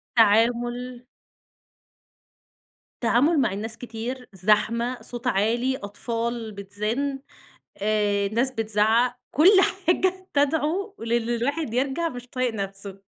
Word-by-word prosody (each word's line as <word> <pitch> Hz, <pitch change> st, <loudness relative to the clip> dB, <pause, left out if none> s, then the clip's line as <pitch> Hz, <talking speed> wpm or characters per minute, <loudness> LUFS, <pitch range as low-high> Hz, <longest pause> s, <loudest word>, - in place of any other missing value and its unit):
تعامُل 240 Hz, +3 st, +2 dB, 2.0 s
تعامُل 275 Hz, +7 st, +3 dB
مع 225 Hz, -7 st, +1 dB
الناس 220 Hz, +2 st, -5 dB
كتير، 245 Hz, +2 st, -6 dB
زحمة، 215 Hz, +6 st, +1 dB
صوت 240 Hz, 0 st, -5 dB
عالي، 240 Hz, +4 st, +1 dB
أطفال 230 Hz, +2 st, -4 dB
بتزِن، 210 Hz, +8 st, -3 dB, 0.6 s
آآ، 205 Hz, -1 st, +1 dB
ناس 235 Hz, +5 st, +1 dB
بتزعّق 225 Hz, +2 st, +2 dB
كل 320 Hz, +7 st, +6 dB, 0.4 s
حاجة 370 Hz, +2 st, +1 dB
تدعو 315 Hz, +8 st, +1 dB
لإن 230 Hz, 0 st, -1 dB
الواحد 240 Hz, +2 st, -1 dB
يرجَع 275 Hz, +6 st, 0 dB
مش 245 Hz, -4 st, -9 dB
طايق 255 Hz, -2 st, -1 dB
نفْسه 195 Hz, -1 st, -6 dB
235 Hz, 100 wpm, -25 LUFS, 215-260 Hz, 2.0 s, كل